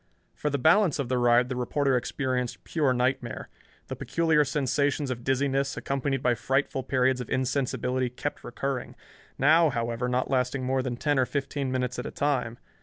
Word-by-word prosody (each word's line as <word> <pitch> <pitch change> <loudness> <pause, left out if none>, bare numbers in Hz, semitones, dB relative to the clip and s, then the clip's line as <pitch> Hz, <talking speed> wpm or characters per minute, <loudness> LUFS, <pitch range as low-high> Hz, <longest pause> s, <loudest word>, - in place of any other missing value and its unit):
For 150 - -2
the 140 - 0
balance 165 +4 +4
of 140 -4 -3
the 130 -1 +1
ride 120 0 +4
the 130 - -4
reporter 135 +2 +1
experienced 125 0 -2
pure 150 -5 +1
nightmare. 125 -1 -1 0.4
The - - -6
peculiar 160 -3 +2
sensations 140 0 0
of 120 -1 -5
dizziness, 135 +1 0
accompanied 135 -1 -2
by 125 - +3
frightful 135 +3 0
periods 130 -1 +1
of 125 - -7
insensibility, 130 -1 0
kept 135 +4 -5
recurring, 130 +1 -4 0.4
now, 160 +4 +5
however, 120 0 -2
not 125 +1 0
lasting 130 0 0
more 130 +1 +1
than 125 -2 -3
ten 145 +1 +1
or 130 - +2
fifteen 140 -1 -2
minutes 125 -1 -2
at 125 - -4
a - - -6
time. 125 -5 -1
130 Hz, 175 wpm, -27 LUFS, 125-140 Hz, 0.4 s, now